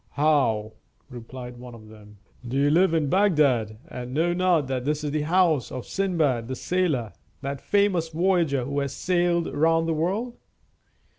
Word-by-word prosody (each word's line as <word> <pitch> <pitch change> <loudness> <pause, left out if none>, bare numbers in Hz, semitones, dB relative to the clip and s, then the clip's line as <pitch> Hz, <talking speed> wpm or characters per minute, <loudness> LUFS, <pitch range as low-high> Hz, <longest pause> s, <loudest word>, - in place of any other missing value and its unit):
"How," 135 -8 +1 0.4
replied 125 +1 -9
one 120 -1 -10
of 110 -2 -14
them, 105 -1 -15 0.3
"do 130 +3 -2
you 145 +1 +3
live 170 +1 +3
in 155 -3 +1
Bagdad, 140 - +2
and 125 +1 -7
know 170 +3 +2
not 175 -4 +2
that 130 -1 -3
this 150 +2 -1
is 145 - -2
the 155 0 -1
house 160 -4 +2
of 130 - -6
Sindbad 155 -12 0
the 130 - -4
Sailor, 150 - -1 0.3
that 140 0 -5
famous 200 -5 +1
voyager 165 -6 +1
who 140 +2 -2
has 140 -1 -3
sailed 175 -2 0
round 165 +2 +2
the 165 - +1
world?" 200 +10 -2
150 Hz, 165 wpm, -25 LUFS, 125-175 Hz, 0.4 s, you